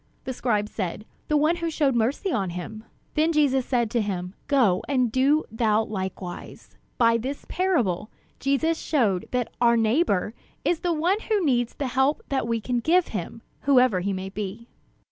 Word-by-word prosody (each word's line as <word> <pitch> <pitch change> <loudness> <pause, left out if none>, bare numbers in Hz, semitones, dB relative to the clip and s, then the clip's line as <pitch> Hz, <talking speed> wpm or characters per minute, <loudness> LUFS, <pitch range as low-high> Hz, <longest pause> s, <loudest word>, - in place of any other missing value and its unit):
The 260 - -4
scribe 215 -4 0
said: 205 0 -4 0.2
"The 300 - +2
one 310 +4 +2
who 335 -1 -2
showed 295 -4 +1
mercy 250 - 0
on 195 - 0
him." 215 +6 -7 0.3
Then 315 +2 +2
Jesus 275 -5 +2
said 235 -4 +1
to 235 - +1
him: 185 -3 -3
"Go 240 -11 +3
and 255 -4 +2
do 275 +5 +3
thou 220 -1 +2
likewise." 190 -3 -6 0.2
By 230 -1 +4
this 270 +5 -5
parable, 245 - 0 0.3
Jesus 315 +5 +1
showed 215 - +1
that 250 -2 -2
"our 235 -1 +5
neighbor" 220 - +1 0.3
is 345 - +2
the 350 - -1
one 340 +6 +1
who 415 -5 +2
needs 245 -4 +1
the 285 - -3
help 265 +3 +1
that 265 -4 0
we 230 -1 0
can 245 +3 -1
give 340 +8 +2
him, - - -5 0.2
whoever 255 -8 +4
he 195 +3 -1
may 190 0 -4
be. 210 +3 -6
245 Hz, 175 wpm, -25 LUFS, 210-290 Hz, 0.3 s, our